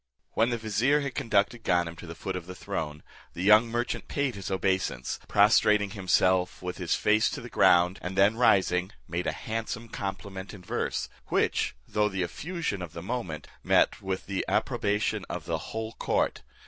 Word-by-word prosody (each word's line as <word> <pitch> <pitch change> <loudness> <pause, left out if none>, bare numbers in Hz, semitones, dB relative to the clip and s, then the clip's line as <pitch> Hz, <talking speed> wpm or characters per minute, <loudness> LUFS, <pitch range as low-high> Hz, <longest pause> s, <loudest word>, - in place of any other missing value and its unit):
When 115 +2 +2
the 120 - 0
vizier 115 +7 +2
had 140 -2 -3
conducted 115 -3 +1
Ganem 85 -4 +1
to 85 - -10
the 85 - -7
foot 95 +2 -4
of 90 -2 -6
the 90 - -7
throne, 75 -3 -4 0.3
the 90 - -4
young 105 +3 +7
merchant 120 +1 -2
paid 140 -3 -1
his 100 -3 -6
obeisance, 95 -9 -1
prostrating 105 0 +4
himself 95 -2 +2
with 90 +1 -5
his 90 -2 +1
face 110 +1 +3
to - - -5
the - - -9
ground, 90 +1 +4
and 95 +1 -5
then 100 +3 +5
rising, 95 -4 +3
made 85 +1 -2
a - - +2
handsome 115 +1 -4
compliment 100 -1 -5
in 95 - -13
verse, - - -2 0.2
which, - - +1
though 105 0 +1
the 95 -2 -1
effusion 150 - -3
of 85 -3 -7
the 85 - -7
moment, 95 -8 -4 0.2
met - - +3
with 95 -1 -3
the 100 -1 -2
approbation 105 0 0
of 85 -3 -5
the 85 -2 -1
whole 110 0 -4
court. - - 0
100 Hz, 180 wpm, -28 LUFS, 90-110 Hz, 0.3 s, young